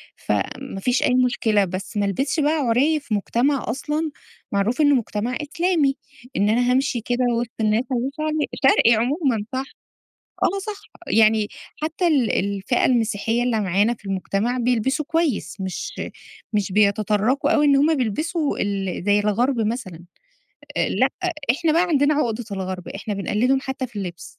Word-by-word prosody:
فما 265 -7 -3
فيش 250 +5 +1
أي 255 - +2
مشكلة. 220 -4 +2
بس 190 +4 -6
ما 205 - +2
ألبسش 270 - -1
بقى 295 +1 +3
عُرِي 285 +2 +2
في 275 -6 -6
مجتمع 245 +7 +1
أصلًا 300 +6 -2 0.4
معروف 210 +8 +1
إنه 290 -1 +5
مجتمع 235 +1 -2
إسلامي. 305 -2 +1 0.4
إن 205 +1 +2
أنا 245 +3 +2
هامشي 255 -2 +1
كده 245 +2 0
وِسط 240 -1 -4
الناس 215 +2 +2
أبيّن 255 +2 0
شعري 310 0 -1 0.3
شرقي 235 - +5
عمومًا 245 - 0
صح. 260 - -1 0.8
آه 395 - +2
صح. 420 -2 -5 0.3
يعني 220 -1 +4 0.3
حتّى 325 +3 -1
ال 275 -8 +2
الفئة 200 +4 0
المسيحية 230 -1 +1
اللي 235 -3 +1
معانا 200 +4 +2
في 215 - -24
المجتمع 195 +5 -1
بيلبسوا 250 +4 +1
كويس 300 - 0
مش 190 -1 -4 0.6
مش 205 -3 0
بيتطرّقوا 210 +5 +2
أوي 295 -1 +4
إن 280 -1 +5
هم 300 +3 +4
بيلبسوا 295 - -1
ال 195 -3 -2
زي 205 0 +4
الغَرْب 230 +5 +1
مثلًا. 210 -7 -3 0.7
أ - - +1
لأ، - - +2 0.4
إحنا 315 +4 0
بقى 335 - +4
عندنا 300 -4 +2
عقدة 245 -5 -1
الغَرْب، 185 -2 -4
إحنا 210 +1 -5
بنقلّدهم 230 +7 +1
حتّى 265 -1 -4
في 235 - -23
اللبس. 175 -3 -5
240 Hz, 155 wpm, -22 LUFS, 205-280 Hz, 0.8 s, إنه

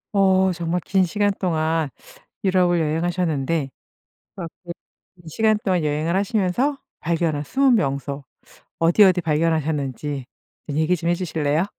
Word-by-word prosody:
어 190 -1 +4
정말 170 +1 -2
긴 190 -1 +2
시간 205 +3 +1
동안 160 -4 0 0.6
유럽을 180 -2 +3
여행하셨는데 160 -2 0 0.7
그렇게 170 -3 -7 0.6
긴 175 -3 -15
시간 215 +5 +2
동안 180 -5 +1
여행을 155 +4 0
하시면서 210 +7 +1 0.2
발견한 160 -3 -1
숨은 265 - +3
명소 140 -4 -2 0.6
어디 170 +5 +5
어디 185 -2 +5
발견하셨는지 150 -4 -1 0.4
얘기 160 +5 +1
좀 170 0 -2
해 175 - +3
주실래요? 160 -1 0
170 Hz, 290 characters per minute, -22 LUFS, 155-185 Hz, 0.7 s, 어디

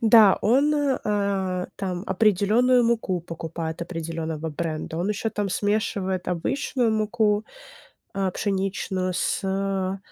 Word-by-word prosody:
Да, 220 -3 +7
он, 275 +7 +4
э, 285 -3 +1
а, 195 -3 0
там 185 -1 -3
определённую 225 +5 +3
муку 220 -6 0
покупает, 165 0 -5
определённого 165 -2 -4
бренда. 160 0 -4
Он 180 - -1
ещё 210 +2 -1
там 205 -1 -2
смешивает 190 -2 -1
обычную 230 +7 0
муку, 215 -1 +1 0.7
а, 195 -1 0
пшеничную 190 -2 -1
с, 175 - 0
э, 195 0 -1
195 Hz, 120 wpm, -25 LUFS, 180-215 Hz, 0.7 s, Да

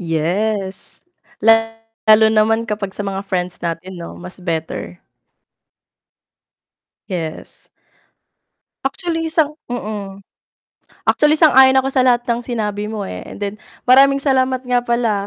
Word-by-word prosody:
Yes, 190 +4 -2 0.4
lalo 225 -1 +3
naman 225 +1 +2
kapag 210 -2 -3
sa 205 - -4
mga 195 0 -3
friends 180 -2 -3
natin 175 +2 -5
'no, 170 - -8
mas 180 +1 -10
better. 160 - -4 2.1
Yes. 165 -4 -6 1.2
Actually 325 +3 -2
sang 305 -2 +1
mm, 210 -5 -6 0.9
actually 300 +1 +3
sang-ayon 265 -4 +6
ako 265 - +1
sa 270 -1 +2
lahat 245 -1 +2
ng 235 0 -1
sinabi 210 -3 -3
mo, 210 -2 -4
eh, 90 0 -7
and - - -10
then, 205 0 -3 0.3
maraming 275 +2 +6
salamat 260 -2 +1
nga 245 -1 +1
pala, 235 -4 0
220 Hz, 120 wpm, -18 LUFS, 195-255 Hz, 2.1 s, sang-ayon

